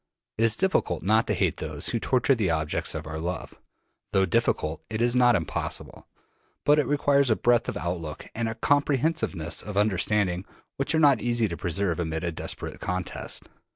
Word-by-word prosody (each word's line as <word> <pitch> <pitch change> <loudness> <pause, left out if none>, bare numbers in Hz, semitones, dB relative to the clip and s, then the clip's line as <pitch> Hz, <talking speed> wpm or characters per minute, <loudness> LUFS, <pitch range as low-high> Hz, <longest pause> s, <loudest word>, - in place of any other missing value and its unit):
It - - +3
is 115 -1 +3
difficult 185 - 0
not 110 +4 +3
to - - +1
hate - - 0
those - - -4
who 115 - -1
torture 130 +3 +2
the 110 -8 0
objects 80 -2 -1
of 75 - -5
our 80 0 -5
love. 90 +3 -5 0.5
Though 95 0 +4
difficult, 80 -2 0
it 110 -1 -3
is 120 +1 +2
not 125 -2 +5
impossible; - - -3 0.6
but 150 +1 +5
it 145 - +1
requires 140 -2 +3
a 110 - +4
breadth 120 +1 +2
of - - -4
outlook 85 -3 -4
and 115 0 -2
a 110 - -5
comprehensiveness 140 - +1
of 105 -1 -6
understanding 100 -2 +1 0.3
which 135 +3 +1
are - - +3
not 140 -6 +5
easy 120 -2 +1
to 85 - -4
preserve 90 +1 -1
amid 80 0 -2
a 85 - -1
desperate 80 - -5
contest. 90 0 -4
105 Hz, 185 wpm, -26 LUFS, 85-125 Hz, 0.6 s, not